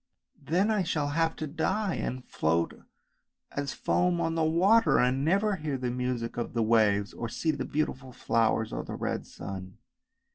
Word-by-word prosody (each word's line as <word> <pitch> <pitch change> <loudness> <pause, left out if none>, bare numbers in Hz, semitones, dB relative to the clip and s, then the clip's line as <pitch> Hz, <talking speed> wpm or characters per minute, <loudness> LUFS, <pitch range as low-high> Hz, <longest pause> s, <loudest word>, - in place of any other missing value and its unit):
" - - -55 0.2
Then 195 +6 +3
I 210 -2 +2
shall 155 -5 -1
have 165 +2 +1
to 155 - -4
die 185 +6 -1
and 130 0 -3
to - - -31
float 85 +2 0 0.8
as 140 -1 -3
foam 180 -1 +1
on 165 -1 0
the 165 -1 +1
water, 185 +8 +4
and 130 +2 +2
never 200 +5 +2
hear 150 -4 -2
the 125 -1 -2
music 125 -2 -2
of 120 - -3
the 115 - +2
waves 105 -3 +3
or 115 - -4
see 160 +7 0
the 140 -3 -3
beautiful 135 -3 -2
flowers 110 -2 +1
or - - -3
the - - -6
red - - -3
sun! 95 0 -8
140 Hz, 185 wpm, -29 LUFS, 115-165 Hz, 0.8 s, water